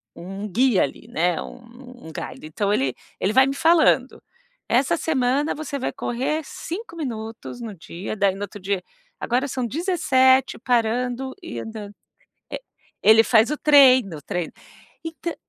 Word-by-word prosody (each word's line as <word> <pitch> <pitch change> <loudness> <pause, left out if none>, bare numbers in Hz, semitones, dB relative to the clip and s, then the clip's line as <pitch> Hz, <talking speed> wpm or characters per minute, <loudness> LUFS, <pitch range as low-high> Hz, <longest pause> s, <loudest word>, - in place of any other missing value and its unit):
um 195 +4 -7
guia 240 +1 +3
ali, 140 - -6
né, 175 +1 0
um 245 -1 -12
um - - -9
galho, - - -6
então 200 +6 -1
ele 130 -8 0 0.2
ele 200 - 0
vai 265 +2 +6
me 275 - -2
falando, 315 -6 +3 0.5
essa 265 +7 +3
semana, 280 -1 0
você 295 -2 -5
vai 260 - -2
correr 265 +6 -2
5 345 +5 -7
minutos 230 -4 -6
no 220 -3 -6
dia, 175 +4 -7
daí 200 -1 +2
no 200 - -6
outro 205 +1 -8
dia, 195 0 -1 0.4
agora 250 +4 0
são 255 -2 -3
17 265 - +2
parando 245 +2 0
e 340 - -6
andando. 215 -2 -8 0.6
Eh, - - -5 0.4
ele 220 +1 +7
faz 225 +2 +4
o 300 - -1
treino, 260 - +5
o - - -11
treino 175 -2 -4 0.5
e 325 - -3
ta 340 +1 -5
245 Hz, 160 wpm, -23 LUFS, 205-270 Hz, 0.6 s, ele